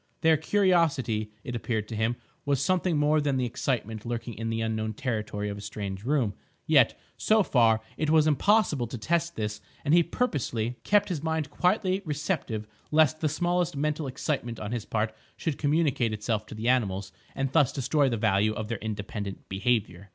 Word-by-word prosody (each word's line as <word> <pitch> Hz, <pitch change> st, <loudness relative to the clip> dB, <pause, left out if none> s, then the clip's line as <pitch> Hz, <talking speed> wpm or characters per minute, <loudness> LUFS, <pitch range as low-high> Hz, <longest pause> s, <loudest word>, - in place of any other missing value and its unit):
Their 160 Hz, -1 st, +5 dB
curiosity, 160 Hz, -, +2 dB
it 120 Hz, -, -5 dB
appeared 110 Hz, -2 st, -2 dB
to 115 Hz, -, -4 dB
him, 110 Hz, +2 st, +1 dB, 0.3 s
was 140 Hz, -2 st, +1 dB
something 180 Hz, +2 st, +1 dB
more 150 Hz, +1 st, +3 dB
than 140 Hz, -2 st, +1 dB
the 130 Hz, -, +1 dB
excitement 115 Hz, -3 st, -2 dB
lurking 120 Hz, 0 st, -4 dB
in 115 Hz, +3 st, -4 dB
the 115 Hz, 0 st, -1 dB
unknown 110 Hz, -1 st, -1 dB
territory 105 Hz, -5 st, -2 dB
of 100 Hz, 0 st, -4 dB
a -, -, -8 dB
strange 100 Hz, -1 st, -5 dB
room; 130 Hz, -7 st, +1 dB, 0.3 s
yet, -, -, +4 dB, 0.2 s
so 215 Hz, -1 st, +4 dB
far, 115 Hz, -8 st, +3 dB, 0.2 s
it 155 Hz, 0 st, 0 dB
was 155 Hz, -1 st, +5 dB
impossible 155 Hz, -, +3 dB
to 120 Hz, -, -6 dB
test 170 Hz, +7 st, 0 dB
this, 105 Hz, -1 st, -3 dB, 0.2 s
and 145 Hz, -, +3 dB
he 175 Hz, -, +7 dB
purposely 125 Hz, -, -1 dB
kept 205 Hz, 0 st, +3 dB
his 165 Hz, -6 st, -2 dB
mind 160 Hz, -2 st, -1 dB
quietly 185 Hz, +2 st, +1 dB
receptive 150 Hz, -, -2 dB, 0.2 s
lest 155 Hz, 0 st, +4 dB
the 155 Hz, -, +1 dB
smallest 175 Hz, 0 st, 0 dB
mental 150 Hz, +1 st, -1 dB
excitement 130 Hz, -3 st, -3 dB
on 105 Hz, -, -5 dB
his 120 Hz, -3 st, -3 dB
part 110 Hz, 0 st, -1 dB, 0.2 s
should 160 Hz, -5 st, -2 dB
communicate 145 Hz, -6 st, +1 dB
itself 110 Hz, 0 st, -2 dB
to -, -, -8 dB
the 110 Hz, +2 st, -3 dB
animals 100 Hz, -6 st, +1 dB, 0.2 s
and 135 Hz, -1 st, -1 dB
thus 145 Hz, -3 st, +4 dB
destroy 140 Hz, +1 st, +1 dB
the 115 Hz, -, -1 dB
value 105 Hz, 0 st, +2 dB
of 110 Hz, 0 st, -5 dB
their 115 Hz, -, -2 dB
independent 100 Hz, -2 st, -5 dB
behaviour. 100 Hz, -2 st, -1 dB
125 Hz, 180 wpm, -28 LUFS, 110-155 Hz, 0.3 s, he